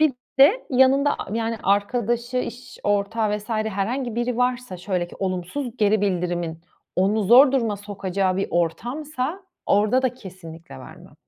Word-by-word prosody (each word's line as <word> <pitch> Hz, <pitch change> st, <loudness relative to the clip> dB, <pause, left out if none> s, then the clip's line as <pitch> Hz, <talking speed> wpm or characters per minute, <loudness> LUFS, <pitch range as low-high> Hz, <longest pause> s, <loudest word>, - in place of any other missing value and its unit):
Bir 310 Hz, -3 st, +4 dB, 0.3 s
de 365 Hz, -, +5 dB
yanında 265 Hz, +2 st, +4 dB
a 210 Hz, -, -5 dB
yani, 230 Hz, 0 st, -1 dB
arkadaşı 235 Hz, +5 st, 0 dB
iş 250 Hz, 0 st, -6 dB
ortağı 205 Hz, +1 st, 0 dB
vs. 210 Hz, -, -14 dB
herhangi 220 Hz, +3 st, -2 dB
biri 240 Hz, 0 st, -1 dB
varsa 250 Hz, -5 st, -1 dB
şöyle 180 Hz, -1 st, -2 dB
ki -, -, -13 dB
olumsuz 195 Hz, +7 st, -3 dB
geri 210 Hz, -1 st, +2 dB
bildirimin 175 Hz, -4 st, -2 dB, 0.4 s
onu 200 Hz, +4 st, +2 dB
zor 250 Hz, +7 st, +7 dB
duruma 230 Hz, -6 st, 0 dB
sokacağı 195 Hz, -2 st, -2 dB
bir 195 Hz, -, 0 dB
ortamsa, 255 Hz, -, -2 dB, 0.2 s
orada 215 Hz, +6 st, +3 dB
da 255 Hz, -2 st, 0 dB
kesinlikle 170 Hz, -, -11 dB
vermem. -, -, -13 dB
215 Hz, 145 wpm, -23 LUFS, 190-250 Hz, 0.4 s, zor